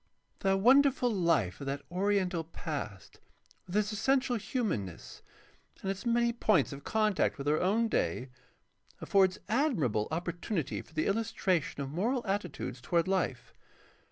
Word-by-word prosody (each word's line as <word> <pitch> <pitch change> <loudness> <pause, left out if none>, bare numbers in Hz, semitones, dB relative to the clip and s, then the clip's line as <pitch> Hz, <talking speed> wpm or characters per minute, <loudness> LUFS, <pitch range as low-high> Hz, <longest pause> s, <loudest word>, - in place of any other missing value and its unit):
The 195 0 +2
wonderful 255 +3 +5
life 160 - +1
of 140 - -5
that 140 +1 -3
oriental 185 -2 +1
past, 145 - -6 0.5
with 180 - -6
its 210 0 +1
essential 255 +3 +1
hiunanness 195 - -3 0.6
and 195 - 0
its 195 +4 -5
many 235 0 +2
points 210 - +2
of 140 - -9
contact 215 -3 +1
with 140 0 -5
our 150 +1 +3
own 215 +5 +2
day, 130 - -1 0.7
affords 190 -2 +3
admirable 195 - +1
opportunity 170 - -3
for 160 - -20
the 155 - +1
illustration 195 -8 0
of 135 - -6
moral 235 - 0
attitudes 195 - -3
toward 170 +5 +1
Ufe. 185 -10 -1
190 Hz, 135 wpm, -31 LUFS, 150-220 Hz, 0.7 s, wonderful